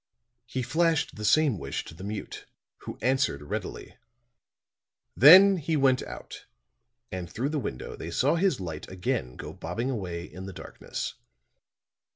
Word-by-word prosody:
He 130 +2 -3
flashed 160 +5 +1
the 105 - -7
same 140 - +3
wish - - -4
to - - -10
the 90 +4 -11
mute, 105 +1 -6 0.4
who - - -5
answered 130 - +1
readily; 70 - -6 1.2
then 190 +8 +9
he 160 -1 -1
went 135 -2 +3
out - - -9 0.6
and 90 -2 -5
through 125 +8 -2
the 155 -1 -1
window 65 - -5
they 80 - -7
saw 130 - +2
his 180 -3 +1
light 80 -5 -6
again 90 -9 -2
go - - -8
bobbing 115 +11 -3
away 90 -8 -4
in 95 +1 -9
the 95 - -7
darkness. - - -6
120 Hz, 150 wpm, -27 LUFS, 90-150 Hz, 1.2 s, then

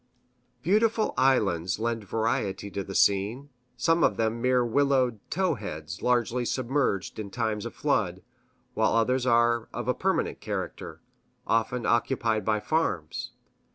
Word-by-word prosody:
Beautiful 215 +4 +2
islands 95 -10 +2
lend 115 -1 -2
variety 100 -2 -1
to 100 - -3
the 95 0 -8
scene, 105 +9 +2 0.3
some 165 +6 +2
of - - +3
them 115 +1 0
mere 125 -1 +3
willowed 130 -2 +2
"tow 185 0 +1
heads" 85 - -7
largely 125 0 +1
submerged 125 -6 -1
in 105 -2 -5
times 110 0 -2
of - - -11
flood, 95 -11 0 0.5
while 110 - +2
others 125 +3 +2
are 120 -1 +3
of - - -5
a - - +3
permanent - - -1
character, - - -5 0.4
often 115 +2 0
occupied 115 -2 +1
by 110 -1 +1
farms. 105 - -2
115 Hz, 135 wpm, -27 LUFS, 105-130 Hz, 0.5 s, of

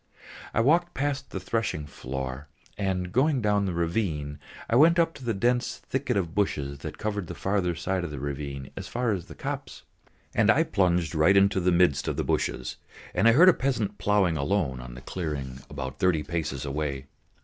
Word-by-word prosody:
I 115 - +2
walked 170 +7 +3
past 140 -1 -2
the 95 - -4
threshing 95 -5 -2
floor 65 0 -5 0.3
and, 95 -3 -2
going 135 - +3
down 105 -3 +2
the 90 - -2
ravine, 80 -5 -1 0.3
I 115 - +1
went 165 +6 +6
up 165 -1 +3
to 135 - -12
the 115 -3 -1
dense 120 +5 +1
thicket 135 -4 -2
of 85 -4 -1
bushes 70 -9 -1
that - - -7
covered 105 -4 -3
the - - -6
further 95 -3 0
side 90 +2 -1
of 85 - -3
the 75 - -6
ravine 70 -1 -5
as - - -6
far 120 -1 0
as 95 -5 -3
the - - -11
copse. - - -5 0.5
And - - +3
I - - +5
plunged 90 -3 +1
right 80 +5 +5
into 100 0 +4
the 90 0 +2
midst 85 -5 +3
of - - -1
the - - 0
bushes, 65 -1 -1 0.4
and - - +3
heard 145 +11 +7
a 185 - +9
peasant 110 -7 -1
ploughing 100 -6 +2
alone 75 -4 0
on - - -9
the 65 - -9
clearing 70 -6 -4
about 65 -2 -6
thirty 90 -5 +2
paces 75 -5 -3
away. 70 -1 -3
90 Hz, 195 wpm, -27 LUFS, 75-110 Hz, 0.5 s, a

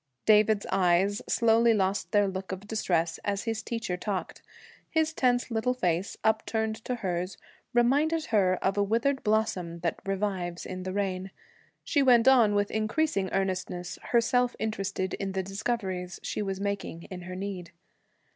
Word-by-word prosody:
David's 215 -1 +4
eyes 190 +2 +2
slowly 230 0 +4
lost 195 0 0
their 205 -2 +4
look 190 0 -5
of 190 +2 -6
distress 170 -6 0
as 200 -1 -1
his 225 -2 -2
teacher 225 -7 -3
talked. 195 0 -4 0.5
His 320 0 +1
tense 245 -3 +1
little 230 +3 0
face, 180 -4 -1
upturned 220 0 0
to 250 - -1
hers, 180 +1 -2 0.3
reminded 290 +7 +2
her 185 -3 +4
of 195 +1 +1
a - - +4
withered 235 +7 +1
blossom 190 -6 0
that 170 -2 -1
revives 190 -3 -2
in 185 0 -5
the 185 0 -4
rain. 190 -1 -2 0.5
She 290 - +1
went 245 -2 +5
on 235 -6 +6
with 205 0 +1
increasing 215 -2 0
earnestness, 185 -2 -2
herself 245 +1 +2
interested 195 -3 -2
in 195 -1 -3
the 190 0 -1
discoveries 190 -3 -3
she - - -3
was 195 -2 -3
making, 200 -4 -3
in 180 -1 -6
her 180 +1 -7
need. 185 -2 -5
200 Hz, 155 wpm, -28 LUFS, 185-225 Hz, 0.5 s, on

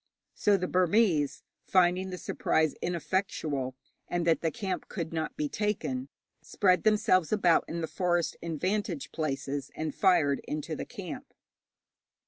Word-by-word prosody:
So 205 -1 +3
the 180 -1 -2
Burmese, 180 -5 +2 0.2
finding 185 0 +3
the 180 - -5
surprise 160 -3 +1
ineffectual, 160 -6 -1 0.3
and 175 -1 -1
that 165 -1 +3
the 165 - +1
camp 195 0 -4
could 170 -4 -4
not 160 -1 -3
be 150 - 0
taken, 220 - -2 0.3
spread 185 -3 +2
themselves 210 -5 +3
about 185 -6 +4
in 170 +1 -4
the 160 - -2
forest 175 -1 0
in 165 -2 -3
vantage 180 -5 -2
places, 140 -2 -3
and 155 -2 -3
fired 170 -8 +3
into 155 +1 -3
the - - -5
camp. 245 - -8
175 Hz, 140 wpm, -29 LUFS, 155-195 Hz, 0.3 s, about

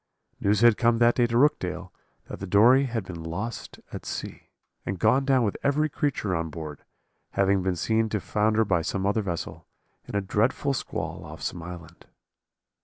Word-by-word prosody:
News 105 +1 +2
had 120 -2 +6
come 120 -1 +3
that 120 0 +5
day 120 -1 +2
to 115 0 0
Rookdale, 95 -10 +1 0.3
that - - -8
the 100 - -5
Dory 120 +8 +6
had 115 -4 -3
been 85 -2 -7
lost 100 +8 -5
at - - -6
sea, - - -6 0.3
and 95 - -3
gone 135 +9 +3
down 135 -3 +3
with 105 - -1
every 150 +2 +1
creature 125 -11 -1
on 80 0 -2
board: 75 -2 -8 0.5
having 100 0 +2
been 95 0 0
seen 110 +5 +1
to 105 - -1
founder 110 +3 +1
by 90 -4 +1
some 95 +4 -2
other 105 +2 +1
vessel, 90 -4 -5 0.4
in - - -6
a 100 - +2
dreadful 115 +8 0
squall 125 - -4
off 75 -2 -10
some 85 - -3
island. 85 -1 -10
105 Hz, 180 wpm, -26 LUFS, 90-120 Hz, 0.5 s, had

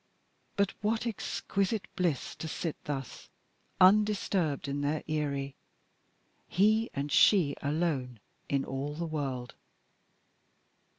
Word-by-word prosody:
But 200 -1 +1
what 220 +3 0
exquisite 200 -2 -1
bliss 175 -8 0
to 160 - -5
sit 160 0 -3
thus, 135 -3 -5 0.5
undisturbed 190 -6 +3
in 140 +1 -2
their 145 +2 -1
eyrie 140 -3 -1 0.9
he 215 +4 +3
and 140 +1 -2
she 175 -6 +5
alone 140 -5 -1 0.3
in 140 -1 +1
all 140 +2 -4
the 170 +2 -3
world. 135 -6 -3
155 Hz, 105 wpm, -30 LUFS, 140-195 Hz, 0.9 s, she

